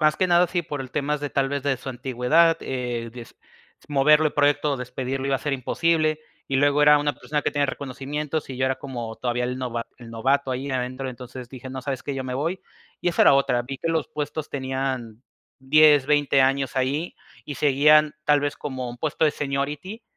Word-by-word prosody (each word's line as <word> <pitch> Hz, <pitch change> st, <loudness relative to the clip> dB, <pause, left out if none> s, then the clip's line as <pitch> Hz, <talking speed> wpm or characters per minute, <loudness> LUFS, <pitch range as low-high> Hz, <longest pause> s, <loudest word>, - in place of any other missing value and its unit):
Más 155 Hz, -1 st, +3 dB
que 185 Hz, -, +2 dB
nada 175 Hz, 0 st, +4 dB
sí 175 Hz, 0 st, -1 dB
por 145 Hz, -2 st, -5 dB
el 130 Hz, -1 st, -7 dB
temas 150 Hz, +1 st, -1 dB
de, 145 Hz, -, -4 dB
tal 135 Hz, -1 st, +1 dB
vez, 140 Hz, -1 st, -3 dB
de 140 Hz, -2 st, 0 dB
su 135 Hz, -, -9 dB
antigüedad, 130 Hz, +6 st, +2 dB
eh, 120 Hz, -3 st, -4 dB
des 120 Hz, -2 st, -11 dB, 0.5 s
moverlo 150 Hz, +2 st, +4 dB
del 150 Hz, -, +1 dB
proyecto 145 Hz, 0 st, +2 dB
o -, -, -1 dB
despedirlo 130 Hz, +2 st, -4 dB
iba 135 Hz, -1 st, +2 dB
a -, -, -8 dB
ser 145 Hz, -, -3 dB
imposible, 155 Hz, +3 st, +1 dB, 0.3 s
y 135 Hz, -, 0 dB
luego 145 Hz, +2 st, +3 dB
era 150 Hz, 0 st, +7 dB
una 145 Hz, 0 st, 0 dB
persona 150 Hz, 0 st, -3 dB
que -, -, 0 dB
tenía 145 Hz, -1 st, +1 dB
reconocimientos 140 Hz, +3 st, -4 dB
y 130 Hz, -, -6 dB
yo 130 Hz, +1 st, +1 dB
era 130 Hz, 0 st, 0 dB
como 120 Hz, -5 st, -6 dB
todavía 125 Hz, 0 st, -1 dB
el 125 Hz, +1 st, -3 dB
nova 120 Hz, -2 st, -3 dB
el 115 Hz, -1 st, -11 dB
novato 135 Hz, +4 st, 0 dB
ahí 130 Hz, +2 st, -3 dB
adentro, 130 Hz, +1 st, -3 dB
entonces 125 Hz, 0 st, -9 dB
dije: 130 Hz, 0 st, -9 dB
"No, 130 Hz, -, -5 dB
¿sabes 135 Hz, -2 st, -4 dB
qué? 140 Hz, -, -4 dB
Yo 135 Hz, -, -3 dB
me 125 Hz, 0 st, -4 dB
voy". 165 Hz, +7 st, -2 dB, 0.4 s
Y 175 Hz, -, +1 dB
esa 170 Hz, -, +3 dB
era -, -, +7 dB
otra, 125 Hz, -3 st, +2 dB
vi 135 Hz, +2 st, -7 dB
que 165 Hz, -, -3 dB
los 160 Hz, -2 st, 0 dB
puestos 150 Hz, +1 st, -4 dB
tenían 130 Hz, -4 st, -3 dB, 0.4 s
10, 150 Hz, +1 st, +5 dB
20 145 Hz, -2 st, +3 dB
años 135 Hz, 0 st, 0 dB
ahí 140 Hz, +6 st, -1 dB, 0.3 s
y 145 Hz, -, -5 dB
seguían, 150 Hz, +3 st, +4 dB
tal 145 Hz, -1 st, +4 dB
vez, 145 Hz, 0 st, -2 dB
como 130 Hz, -3 st, -5 dB
un 120 Hz, -, -10 dB
puesto 155 Hz, +2 st, 0 dB
de 150 Hz, -, +4 dB
seniority, 145 Hz, -, -4 dB
140 Hz, 215 wpm, -24 LUFS, 130-150 Hz, 0.5 s, era